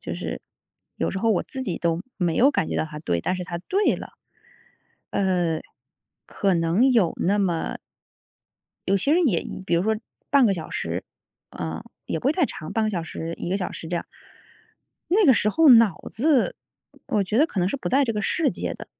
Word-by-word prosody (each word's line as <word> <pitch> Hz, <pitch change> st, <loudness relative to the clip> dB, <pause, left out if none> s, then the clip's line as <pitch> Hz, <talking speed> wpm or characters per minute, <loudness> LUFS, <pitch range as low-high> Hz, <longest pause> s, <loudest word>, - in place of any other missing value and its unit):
就 -, -, -5 dB
是 -, -, -5 dB, 0.6 s
有 -, -, -1 dB
时 195 Hz, -, -3 dB
候 225 Hz, +2 st, +2 dB
我 185 Hz, -, +1 dB
自 265 Hz, -, -6 dB
己 185 Hz, -8 st, -3 dB
都 170 Hz, -1 st, 0 dB, 0.2 s
没 175 Hz, -4 st, 0 dB
有 265 Hz, +4 st, +6 dB
感 -, -, 0 dB
觉 -, -, -2 dB
到 -, -, +1 dB
它 150 Hz, -1 st, -8 dB
对， 85 Hz, -, -1 dB
但 185 Hz, -, -1 dB
是 180 Hz, -, -4 dB
它 175 Hz, -1 st, -5 dB
对 385 Hz, -, +1 dB
了。 -, -, -9 dB, 1.0 s
呃， 175 Hz, -4 st, +1 dB, 0.7 s
可 195 Hz, -2 st, 0 dB
能 170 Hz, +9 st, +3 dB
有 215 Hz, -9 st, +3 dB
那 200 Hz, +3 st, +1 dB
么 175 Hz, -4 st, -1 dB, 1.1 s
有 195 Hz, -, +3 dB
些 280 Hz, +10 st, +1 dB
人 350 Hz, 0 st, +4 dB
也 180 Hz, -11 st, +2 dB
一 -, -, -7 dB
比 175 Hz, -, 0 dB
如 170 Hz, -, +2 dB
说 220 Hz, +2 st, +1 dB, 0.3 s
半 275 Hz, -4 st, +6 dB
个 195 Hz, -, +2 dB
小 165 Hz, -3 st, -7 dB
时， 85 Hz, +3 st, -3 dB, 0.5 s
呃， 80 Hz, 0 st, -5 dB, 0.2 s
也 160 Hz, -, -2 dB
不 -, -, -3 dB
会 280 Hz, -, +4 dB
太 345 Hz, 0 st, +2 dB
长， 155 Hz, -4 st, -7 dB
半 225 Hz, -1 st, +1 dB
个 215 Hz, -, 0 dB
小 175 Hz, -4 st, -2 dB
时、 165 Hz, 0 st, -5 dB
1 -, -, -5 dB
个 190 Hz, -, 0 dB
小 185 Hz, -, -3 dB
时 160 Hz, -, -8 dB
这 175 Hz, -, -1 dB
样。 -, -, -3 dB, 1.1 s
那 400 Hz, +2 st, +4 dB
个 265 Hz, -, +7 dB
时 210 Hz, -, +2 dB
候 320 Hz, +7 st, +4 dB
脑 230 Hz, -8 st, +6 dB
子， 295 Hz, -, +2 dB, 0.5 s
我 205 Hz, -2 st, +1 dB
觉 210 Hz, -, -2 dB
得 285 Hz, -, +6 dB
可 265 Hz, -, -4 dB
能 180 Hz, +1 st, +2 dB
是 280 Hz, -, -2 dB
不 265 Hz, -, -4 dB
在 275 Hz, +2 st, +3 dB
这 230 Hz, -, -1 dB
个 210 Hz, -, -2 dB
世 310 Hz, -, +1 dB
界 -, -, -3 dB
的， -, -, -10 dB
195 Hz, 230 characters per minute, -24 LUFS, 170-250 Hz, 1.1 s, 个